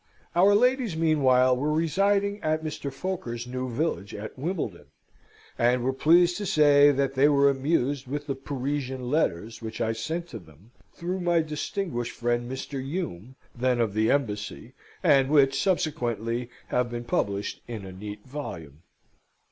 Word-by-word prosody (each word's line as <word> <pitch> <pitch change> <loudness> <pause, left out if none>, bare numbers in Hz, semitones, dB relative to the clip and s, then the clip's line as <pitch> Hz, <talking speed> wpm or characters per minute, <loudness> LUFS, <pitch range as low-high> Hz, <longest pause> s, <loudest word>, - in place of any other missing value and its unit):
Our 195 +4 +6
ladies, 250 -5 +2
meanwhile, 130 -6 +4
were 145 +4 -1
residing 200 +6 +1
at 155 0 0
Mr. 150 -2 -4
Foker's 135 -7 -4
new 130 +1 -4
villa 140 -3 -1
at 105 +1 -7
Wimbledon, 130 - -4 0.7
and 120 +1 +3
were 130 +1 +1
pleased 175 +5 +4
to 210 - -4
say 145 -2 +6
that 135 -1 0
they 135 +2 +4
were 140 -1 +5
amused 140 -1 0
with 145 +2 -4
the 140 - -2
"Parisian 135 -1 -4
letters" 115 - -1
which 110 -1 -6
I 110 - +1
sent 160 +10 -4
to 115 - -7
them, 85 +5 -19 0.2
through 180 +2 -4
my 175 -2 +2
distinguished 150 - -3
friend 120 +1 -1
Mr. 130 0 -5
Hume, 130 - -5 0.2
then 125 0 0
of 110 -4 +1
the 110 +1 +2
Embassy, 115 -2 -2 0.3
and 135 -1 +4
which 135 -2 +4
subsequently 120 - -1 0.2
have 125 -1 +1
been 120 0 -5
published 100 -3 -2
in 110 -5 -6
a 95 - -8
neat 105 +2 -8
volume. 80 - -7
135 Hz, 155 wpm, -26 LUFS, 120-155 Hz, 0.7 s, Our